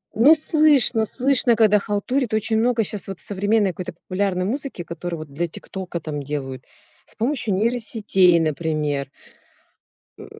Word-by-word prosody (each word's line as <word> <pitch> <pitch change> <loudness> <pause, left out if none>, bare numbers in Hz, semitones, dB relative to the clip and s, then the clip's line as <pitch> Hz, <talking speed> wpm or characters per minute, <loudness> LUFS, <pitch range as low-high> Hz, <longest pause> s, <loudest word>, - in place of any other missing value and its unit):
Ну 275 +9 +7
слышно, 300 -7 +3
слышно, 255 0 +2
когда 215 -2 +4
халтурит, 220 +4 -2
очень 220 +1 +1
много 235 0 +2
щас 205 -1 -5
вот 195 -2 -7
современной 205 0 0
какой-то 180 0 -7
популярной 185 +1 -2
музыки, 265 -3 -4
которую 170 0 -6
вот 155 -3 -10
для 170 +4 -1
"Тиктока" 180 +1 -7
там 150 -2 -5
делают. 135 -2 -5 0.4
С - - -16
помощью 230 -4 -1
нейросетей, 210 -5 +2
например. 150 -3 -1 1.1
Э. - - -10
200 Hz, 140 wpm, -22 LUFS, 170-230 Hz, 1.1 s, Ну